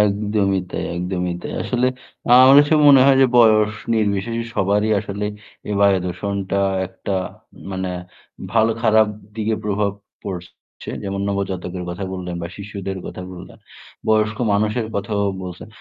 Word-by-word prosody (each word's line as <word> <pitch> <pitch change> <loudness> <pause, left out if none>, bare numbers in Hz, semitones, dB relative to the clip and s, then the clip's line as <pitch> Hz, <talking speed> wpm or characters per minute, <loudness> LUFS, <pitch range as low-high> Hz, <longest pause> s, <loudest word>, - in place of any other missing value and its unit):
একদমই 100 -1 +1
তাই, - - -3
একদমই 90 0 -2
তাই। - - -5
আসলে 125 0 0 0.4
আ - - +1
আমার 135 +1 +8
কাছে 145 +2 +2
মনে 135 -2 +8
হয় 135 -1 +6
যে - - +6
বয়স 110 -2 +5 0.2
নির্বিশেষে 110 +2 0
সবারই 105 +1 +1
আসলে 100 +1 -5 0.4
এই 105 - -1
বায়ু 100 -1 +5
দূষণটা 100 +2 -2 0.3
একটা 95 +2 -6 0.6
মানে 95 -1 -3 0.6
ভালো 115 0 +3
খারাপ 110 -1 +5 0.3
দিকে 110 0 0
প্রভাব 105 0 0 0.3
পড়ছে। 90 -3 -9
যেমন 100 0 -3
নবজাতকের 95 -2 -3
কথা 90 +3 -5
বললেন 90 -2 -5
বা - - -3
শিশুদের 100 -1 -6
কথা 90 - -7
বললেন। 90 - -11 0.5
বয়স্ক 110 0 +2
মানুষের 110 +3 0
কথাও 100 0 -1 0.2
বলছেন। 90 -1 -8
100 Hz, 140 wpm, -20 LUFS, 95-110 Hz, 0.6 s, আমার